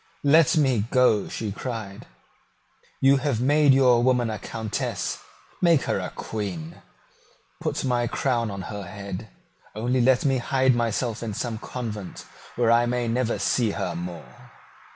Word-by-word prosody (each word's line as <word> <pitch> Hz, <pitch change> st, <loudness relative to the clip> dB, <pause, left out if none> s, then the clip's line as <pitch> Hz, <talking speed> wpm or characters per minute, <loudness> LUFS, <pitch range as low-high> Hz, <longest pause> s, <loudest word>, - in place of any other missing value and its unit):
"Let 160 Hz, +3 st, +5 dB
me 130 Hz, -8 st, +2 dB
go," 125 Hz, -5 st, +3 dB
she 110 Hz, -3 st, -4 dB
cried. 110 Hz, -3 st, -6 dB, 0.9 s
"You 135 Hz, +1 st, +5 dB
have 135 Hz, -4 st, -1 dB
made 145 Hz, +3 st, +4 dB
your 130 Hz, -3 st, +5 dB
woman 125 Hz, -2 st, +2 dB
a 105 Hz, -, -5 dB
Countess: 110 Hz, -2 st, -3 dB, 0.4 s
make 170 Hz, -5 st, +4 dB
her -, -, -1 dB
a -, -, -4 dB
Queen. 90 Hz, -7 st, -6 dB, 0.8 s
Put -, -, -2 dB
my 120 Hz, -2 st, +1 dB
crown 120 Hz, -2 st, 0 dB
on 100 Hz, -1 st, -6 dB
her 105 Hz, -, -5 dB
head. 100 Hz, +2 st, -7 dB, 0.5 s
Only 125 Hz, +4 st, 0 dB
let 125 Hz, +2 st, +3 dB
me 135 Hz, -2 st, +2 dB
hide 130 Hz, +1 st, +2 dB
myself 120 Hz, 0 st, -1 dB
in 110 Hz, -3 st, -4 dB
some 115 Hz, -1 st, -3 dB
convent, 105 Hz, -7 st, -6 dB, 0.3 s
where 120 Hz, -1 st, +2 dB
I 120 Hz, +1 st, +4 dB
may 120 Hz, 0 st, -1 dB
never 120 Hz, 0 st, 0 dB
see 120 Hz, -4 st, +1 dB
her 90 Hz, -, -2 dB
more." 85 Hz, -1 st, -8 dB
120 Hz, 150 wpm, -25 LUFS, 105-130 Hz, 0.9 s, Let